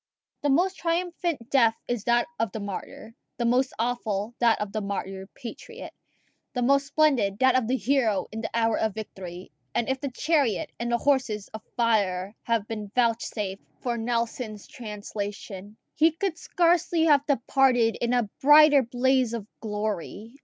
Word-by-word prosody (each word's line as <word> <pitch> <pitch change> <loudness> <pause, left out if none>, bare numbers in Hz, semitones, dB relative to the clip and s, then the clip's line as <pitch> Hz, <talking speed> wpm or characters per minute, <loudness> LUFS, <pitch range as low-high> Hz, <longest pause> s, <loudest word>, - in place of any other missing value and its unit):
The 290 - +1
most 360 +7 +2
triumphant 335 -6 -2
death 230 -5 +4
is 240 -4 -2
that 240 0 +3
of 225 -3 0
the 220 - -4
martyr; 200 +2 -7 0.2
the 240 - -1
most 255 +2 +2
awful, 225 -2 -2
that 235 -2 +4
of 210 -1 -3
the 215 - -2
martyred 195 -1 -5
patriot; 455 - -9 0.6
the 250 - -1
most 275 +2 +3
splendid, 270 -11 +2
that 260 +1 +4
of 255 -3 +2
the 260 +2 +1
hero 225 -5 +1
in 220 +1 -5
the 220 - -3
hour 225 -1 +1
of 220 -3 0
victory; 185 -4 -8 0.2
and 235 - +1
if 265 0 -1
the 280 - -2
chariot 295 -1 0
and 235 0 -2
the 235 - +3
horses 250 -6 0
of 220 - -8 0.2
fire 205 -4 +1
had 230 -3 -1
been 210 -3 -6
vouchsafed 225 -5 0 0.2
for 240 -2 -1
Nelson's 230 -2 -3
translation, 210 -4 -7 0.2
he 320 +2 +4
could 330 +2 -2
scarcely 340 0 +2
have 290 -3 +5
departed 250 -3 +3
in 235 - +1
a 245 -3 +2
brighter 295 0 +7
blaze 255 0 +1
of 220 -4 -5
glory. 215 0 -4
235 Hz, 160 wpm, -26 LUFS, 215-270 Hz, 0.6 s, brighter